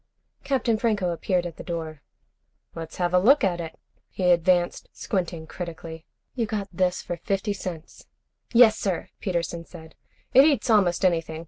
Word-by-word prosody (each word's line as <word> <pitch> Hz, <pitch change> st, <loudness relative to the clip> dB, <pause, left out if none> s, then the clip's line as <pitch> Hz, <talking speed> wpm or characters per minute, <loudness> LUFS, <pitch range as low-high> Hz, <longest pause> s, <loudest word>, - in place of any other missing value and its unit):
Captain 250 Hz, -5 st, 0 dB
Franco 210 Hz, -6 st, +1 dB
appeared 175 Hz, +1 st, -1 dB
at 170 Hz, -2 st, -7 dB
the -, -, -8 dB
door. 160 Hz, -4 st, -5 dB, 0.7 s
"Let's 165 Hz, -1 st, -8 dB
have 175 Hz, -1 st, -1 dB
a 180 Hz, -, +6 dB
look 265 Hz, +9 st, +5 dB
at 175 Hz, -3 st, +1 dB
it." 165 Hz, -1 st, -8 dB, 0.3 s
He 180 Hz, -2 st, +1 dB
advanced, 175 Hz, 0 st, +2 dB
squinting 175 Hz, -4 st, -3 dB
critically. 165 Hz, -1 st, -8 dB, 0.3 s
"You 230 Hz, -4 st, -1 dB
got 205 Hz, -2 st, -3 dB
this 180 Hz, 0 st, 0 dB
for 175 Hz, -, -4 dB
fifty 200 Hz, +3 st, -2 dB
cents?" 175 Hz, -4 st, -8 dB, 0.4 s
"Yes, 230 Hz, -2 st, +6 dB
sir," 190 Hz, -4 st, -2 dB
Peterson 170 Hz, -2 st, -2 dB
said. 160 Hz, -2 st, -13 dB, 0.4 s
"It 265 Hz, -, +9 dB
eats 280 Hz, -5 st, +2 dB
almost 190 Hz, -3 st, +3 dB
anything. 165 Hz, -3 st, 0 dB
180 Hz, 155 wpm, -25 LUFS, 170-205 Hz, 0.7 s, It